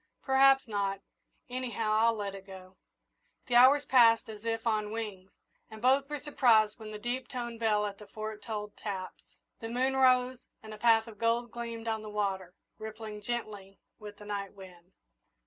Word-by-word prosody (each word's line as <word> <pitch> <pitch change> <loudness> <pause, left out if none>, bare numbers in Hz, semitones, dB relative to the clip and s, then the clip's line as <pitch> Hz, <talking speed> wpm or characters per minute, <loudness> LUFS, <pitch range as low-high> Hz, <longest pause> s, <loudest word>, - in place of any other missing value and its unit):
"Perhaps 270 0 +4
not 200 -2 -2 0.5
anyhow, 245 -4 -3
I'll 225 +2 +3
let 200 -2 -4
it 195 0 -11
go." 190 -1 -12 0.7
The 245 - -5
hours 270 +4 +7
passed 230 -3 +5
as 215 0 -10
if 225 0 -2
on 215 -2 0
wings, 210 -4 -6 0.4
and 220 - -10
both 270 +4 +3
were 295 - -3
surprised 235 -7 +3
when 215 -1 -8
the 215 - -6
deep 245 +3 -4
toned 240 -2 -6
bell 210 -2 +2
at 200 -1 -6
the 210 - -12
Fort 215 0 -7
tolled 210 -2 -6
taps. 190 -3 -6 0.4
The 225 - -6
moon 260 +3 0
rose 255 -1 +3 0.2
and 215 0 -9
a 215 - -10
path 225 -1 +4
of 220 -3 -13
gold 230 0 0
gleamed 230 -1 -6
on 220 -1 -1
the 215 - -8
water, 195 -3 -3 0.2
rippling 215 -1 -7
gently 205 -4 -5 0.2
with 210 -1 -10
the 210 - -12
night 200 -1 -4
wind. 185 -2 -14
220 Hz, 180 wpm, -30 LUFS, 210-240 Hz, 0.7 s, hours